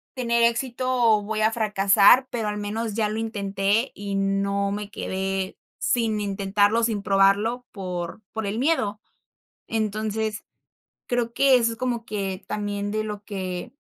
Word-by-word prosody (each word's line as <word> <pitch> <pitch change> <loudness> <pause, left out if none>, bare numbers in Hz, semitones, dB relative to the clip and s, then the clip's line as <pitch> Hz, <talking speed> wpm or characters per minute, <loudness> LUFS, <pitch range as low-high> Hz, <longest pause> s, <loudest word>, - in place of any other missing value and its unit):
tener 235 -2 +1
éxito 240 +2 0
o 230 -4 +4
voy 215 +1 -2
a 220 +1 +4
fracasar, 210 +3 +5
pero 225 -3 -2
al 210 - -3
menos 215 +1 -3
ya 220 -2 +1
lo 220 +1 -3
intenté 205 +1 0
y 200 -1 -4
no 200 0 0
me 205 0 -4
quedé 190 -1 -3 0.2
sin 225 -3 +1
intentarlo, 205 +2 +1
sin 215 -3 0
probarlo, 200 +5 +3
por 180 0 -5
por 220 -2 -3
el 210 +3 -2
miedo." 220 -8 +1 0.7
Entonces, 215 0 -2 0.6
creo 240 -1 -1
que 275 0 +5
eso 230 -1 +2
es 225 - -9
como 240 -2 -2
que 195 -4 -4
también 205 -1 -3
de 215 - 0
lo 210 -1 -6
que. 190 +3 -5
210 Hz, 150 wpm, -24 LUFS, 200-230 Hz, 0.7 s, fracasar